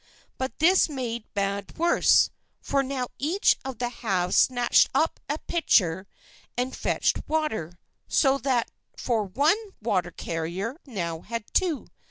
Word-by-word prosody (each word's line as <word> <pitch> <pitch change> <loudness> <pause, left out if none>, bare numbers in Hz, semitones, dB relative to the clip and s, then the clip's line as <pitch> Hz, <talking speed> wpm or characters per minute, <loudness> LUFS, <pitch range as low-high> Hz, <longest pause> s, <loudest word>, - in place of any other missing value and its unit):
But 260 -3 -3
this 355 +2 +4
made 240 -5 -5
bad 200 0 -2
worse; 340 +1 +4 0.3
for 275 - 0
now 265 -1 -2
each 330 +9 +3
of 265 -3 -6
the 245 +1 -1
halves 190 -7 -1
snatched 245 -2 +4
up 320 +4 +1
a 295 - 0
pitcher 190 - +1 0.5
and 250 +1 -1
fetched - - 0
water; 220 - -2 0.3
so 275 -1 +3
that 250 -3 0 0.3
for 230 -4 0
one 285 - +2 0.2
water 190 -6 0
carrier 170 +6 -4
I 285 -3 -20
now 170 -6 -3
had 230 +3 -5
two. 345 -7 +1
245 Hz, 140 wpm, -26 LUFS, 195-280 Hz, 0.5 s, this